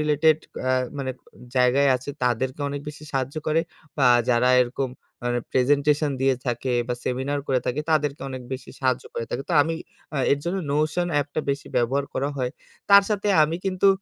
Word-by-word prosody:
Related 150 +1 +4 0.3
আ - - +3 0.3
মানে 130 -1 -2 0.5
জায়গায় 130 +3 +4
আছে, 130 +3 -7
তাদেরকে 130 +3 0
অনেক 140 0 -4
বেশি 150 0 -9
সাহায্য 135 +1 -2
করে 155 +1 +3 0.4
বা 135 - +4 0.2
যারা 125 +1 +3
এরকম 125 +1 -3 0.4
মানে 120 0 0
প্রেজেন্টেশন 145 +3 +3
দিয়ে 135 0 +3
থাকে 120 +2 -1 0.2
বা 125 - 0
সেমিনার 135 +3 -1
করে 130 -2 +1
থাকে, 130 +4 0
তাদেরকে 150 -2 +1
অনেক 130 -1 -6
বেশি 130 - -6
সাহায্য 130 -1 +1
করে 115 - -2
থাকে। 135 - -2
তো - - -2
আমি 165 +2 -2 0.4
অ্যা 145 - 0
এর 140 - +2
জন্য 175 +3 -1 0.2
নোশন 155 +4 +1
অ্যাপটা 145 +1 0
বেশি 140 0 -3
ব্যবহার 130 +4 +1
করা 140 +2 0
হয়। 125 -2 -1 0.4
তার 200 0 +9
সাথে 205 0 0
আমি 160 +2 +1
কিন্তু 190 0 +3
140 Hz, 180 wpm, -24 LUFS, 130-150 Hz, 0.5 s, তার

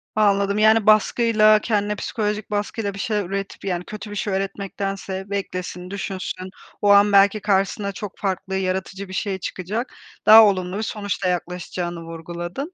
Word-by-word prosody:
Anladım, 200 -1 +2
yani, 220 0 +5
baskıyla, 215 0 +5
kendine 210 -1 0
psikolojik 210 0 -3
baskıyla 205 0 -2
bir 195 - -9
şeyler 210 -1 -1
üretip, 195 +2 -5
yani, 180 -2 -2
kötü 210 0 -8
bir - - -6
şey 205 0 -2
üretmektense 195 0 -4
beklesin, 185 -2 -4
düşünsün, 190 -1 -5 0.3
o 205 - +3
an 200 +1 +6
belki 200 +1 +5
karşısına 200 0 0
çok 200 0 -8
farklı 190 -1 -3
yaratıcı 190 +1 -3
bir 185 - -10
şey 190 0 -2
çıkacak, 205 +8 -4 0.3
daha 220 +1 +10
olumlu 185 -2 0
bir - - -2
sonuçla 205 -3 -3
yaklaşacağını 175 -1 -4
vurguladın. 175 - -6
200 Hz, 150 wpm, -22 LUFS, 185-210 Hz, 0.3 s, daha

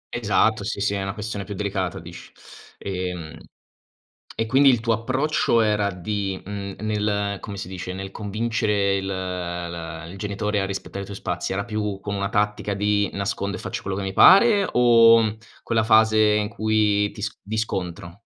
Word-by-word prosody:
Esatto, 110 -1 +2
sì, 100 - -3
sì, 100 0 0
è 100 - -2
una 95 +1 -4
questione 105 -2 -4
più 100 +1 -7
delicata 95 -3 -2
dici. - - -11 0.5
Ehm, 90 -4 -5 1.0
e 115 - -1
quindi 135 +3 +5
il 120 -3 +2
tuo 115 0 0
approccio 130 +2 +1
era 105 -2 +1
di 95 +1 -3
mhmm, 100 0 -6
nel 105 -1 -1
come 100 -2 -7
si 95 -2 -6
dice, 90 -1 -6
nel 95 +1 -6
convincere 105 -1 0
il 95 0 -3
l 85 -3 -5
il 95 - -10
genitore 105 0 -2
a 95 - -1
rispettare 100 0 -5
i - - -6
tuoi 100 0 -8
spazi, 90 0 -3
era 100 +1 -2
più 105 -3 -3
come 100 0 -4
una 100 0 -1
tattica 105 0 -1
di 105 0 +1
nascondo 100 0 -3
e - - -8
faccio - - -5
quello 95 0 -3
che 100 - -3
mi 95 0 -3
pare 200 - +6
o 115 -2 +5 0.3
quella 110 -1 +1
fase 110 -1 +5 0.2
in 105 -1 0
cui 105 -2 +1
ti 105 - -9
s 105 - -4
di 110 +2 -5
scontro? 90 -4 -4
100 Hz, 180 wpm, -23 LUFS, 95-110 Hz, 1.0 s, pare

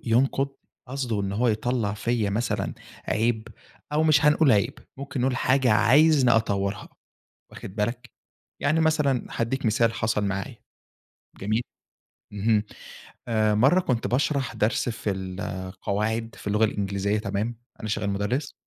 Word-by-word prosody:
ينقُد 135 +4 +2 0.4
قصده 125 -5 -2
إن 100 0 -2
هو 120 +4 +1
يطلَّع 110 -1 0
فيّا 110 -1 0
مثلًا 110 +3 -1 0.3
عيب 110 0 0 0.4
أو 150 - +2
مش 155 -1 +4
هنقول 150 -2 +5
عيب 110 +6 +1 0.2
ممكن 140 -1 -4
نقول 130 0 +1
حاجة 130 -1 +3
عايزني 130 +6 +5
أطورها، 100 -3 0 0.6
واخد 95 - -10
بالَك؟ 115 +4 -2 0.5
يعني 155 +3 +2
مثلًا 150 -6 +2
هادِّيك 120 +3 -2
مثال 115 +1 +2
حصل 110 -2 0
معايا، 100 -1 -3 0.9
جميل. 110 +4 0 0.7
اهم، 105 +1 +2 0.7
آآ، 110 -2 +2
مرة 135 - +5
كنت 125 -10 -1
باشرح 135 +1 0
درس 110 +3 +1
في 110 -2 -2
القواعد 95 +4 -3
في - - -8
اللغة 105 +2 +3
الإنجليزية 100 0 -1
تمام، 105 +3 -2 0.2
أنا 110 - -5
شغّال 105 -1 -1
مُدرِّس 110 +8 -2
115 Hz, 130 wpm, -25 LUFS, 105-130 Hz, 0.9 s, هنقول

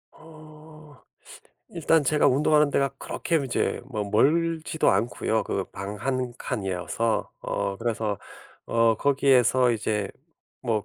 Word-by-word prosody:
어. 155 -2 -15 0.7
일단 165 -2 +2
제가 150 +2 +3
운동하는 150 +2 +3
데가 140 -1 +2
그렇게 170 - -2
이제 130 - -1
뭐 110 -6 -3
멀지도 160 +9 +2
않고요. 110 +2 0
그 95 - -2
방 100 +2 -6
1 130 +1 -2
칸이어서. 105 0 -2
어 100 -1 -2
그래서 110 -3 -2 0.5
어 115 -1 +3
거기에서 130 -2 +3
이제 105 -2 -1 0.5
뭐 110 -4 -1
125 Hz, 225 characters per minute, -25 LUFS, 110-150 Hz, 0.7 s, 제가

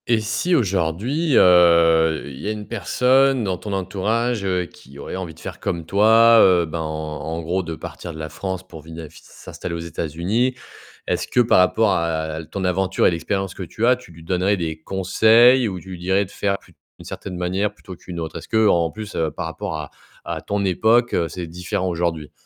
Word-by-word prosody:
Et 115 -2 +3
si 120 +12 0
aujourd'hui, 110 - 0
heu, 85 -3 +5
il 65 -2 -9
y - - -5
a - - 0
une 105 -1 -6
personne 125 +5 +2
dans 95 -3 -1
ton 105 - -7
entourage, 105 +4 -1
heu, 90 -2 0
qui 70 -4 -16
aurait 70 - -7
envie 90 -4 -6
de - - -18
faire - - -8
comme 85 -2 -3
toi, 110 +5 +6
heu, 90 -4 +5
ben, 80 +1 -5
en 80 +1 -4
gros, 90 +4 -1
de 85 -2 -6
partir 85 - -8
de 80 - -10
la 80 0 -5
France 95 0 -5
pour 80 -3 -11
vina 80 +1 -9
s 80 +2 -14
s'installer 85 - -8
aux - - -3
États-Unis, 85 - -2 0.5
est-ce - - -2
que, - - 0
par 120 -5 +5
rapport 100 +3 +3
à 80 -1 -2
ton 95 +4 -5
aventure 95 +1 +1
et - - +5
l'expérience 95 +2 -2
que - - -10
tu 110 +6 -3
as, 125 +1 +5
tu 125 -8 -15
lui 80 0 -14
donnerais 95 +4 +1
des 80 -2 -4
conseils? 110 +7 +4
Ou 95 -3 -4
tu 95 - -14
lui 90 - -7
dirais 95 +3 +1
de 95 - -16
faire 100 -1 -1
plus - - -22 0.2
d'une - - -13
certaine 90 -3 -7
manière 95 +4 -1
plutôt 95 -3 -11
qu'une 85 0 -8
autre? 80 0 -5
Est-ce 80 - -10
qu'en 100 -7 +3
plus, 110 +1 -8
heu, 80 -1 0
par - - -5
rapport 80 0 -5
à 75 -2 -7 0.3
à 85 -1 -4
ton 100 +5 -2
époque, 110 +6 +2
c'est 85 +2 -6
différent, 90 +2 -3
aujourd'hui? 85 -3 -2
90 Hz, 210 wpm, -21 LUFS, 85-105 Hz, 0.5 s, toi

